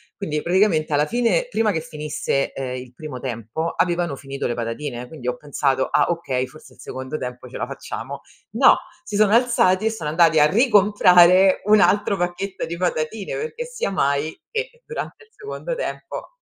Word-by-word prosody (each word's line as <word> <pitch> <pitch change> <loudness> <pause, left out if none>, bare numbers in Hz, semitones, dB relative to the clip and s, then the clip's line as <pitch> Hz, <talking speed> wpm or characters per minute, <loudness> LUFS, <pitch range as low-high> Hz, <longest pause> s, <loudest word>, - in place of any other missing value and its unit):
Quindi, 150 -7 -3
praticamente 175 -4 +2
alla 145 +1 +3
fine 245 - +1
prima 225 - +1
che 160 -3 -2
finisse, 150 -3 -2
ehm, 130 -2 -4
il 125 -1 -10
primo 150 -2 -8
tempo 120 +6 -4
avevano 175 -4 0
finito 135 0 -6
le 120 - -1
patatine, 120 +2 -4
quindi 140 -5 -9
ho 125 - 0
pensato: 140 -2 0
"Ah - - +3
okay, 135 -7 -1
forse 135 -1 -16
il - - -25
secondo 130 +4 -6
tempo 125 -1 -7
ce - - -8
la - - -2
facciamo." - - -7 0.3
No, - - +6 0.3
si 210 - -6
sono 215 -1 +4
alzati 225 -5 +3
e - - +1
sono 165 -9 -4
andati 165 0 +4
a 150 - +7
ricomprare 190 - +5
un 210 0 +6
altro 205 0 +3
pacchetto 175 +2 -3
di 170 +1 -5
patatine, 180 +3 -2
perché 470 +1 -4
sia 485 - -3
mai 145 -3 0
che 485 +1 -4
durante 460 -1 -6
il 445 - -34
secondo 445 +4 -6
tempo - - -6
170 Hz, 180 wpm, -22 LUFS, 140-210 Hz, 0.3 s, a